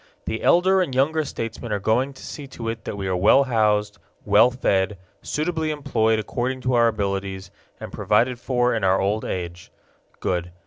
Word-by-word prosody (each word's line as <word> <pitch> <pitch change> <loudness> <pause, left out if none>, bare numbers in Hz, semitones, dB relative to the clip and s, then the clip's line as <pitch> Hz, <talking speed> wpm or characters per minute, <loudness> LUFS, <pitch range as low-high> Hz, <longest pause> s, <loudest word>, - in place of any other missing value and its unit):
The 110 - -3
elder 185 +2 +4
and 135 -8 -2
younger 155 +4 +2
statesmen 115 -4 -6
are 105 - +1
going 125 +7 +1
to 130 - -12
see 145 -2 -8
to 115 -3 -6
it 115 -1 -6
that - - -5
we 100 - -4
are 95 -1 0
well 105 +9 +5
housed, 105 -4 +1 0.3
well 120 - +6
fed, 100 -5 0 0.2
suitably 160 0 -2
employed 125 -7 +1
according 125 +4 -3
to 125 0 0
our 120 -1 +5
abilities, 100 -3 -3 0.3
and - - -8
provided 120 +4 +1
for 125 -1 +1
in 115 -3 -2
our 95 0 +3
old 105 +3 0
age. 85 -1 -5 0.5
Good. 90 -1 -2
115 Hz, 180 wpm, -23 LUFS, 100-130 Hz, 0.5 s, well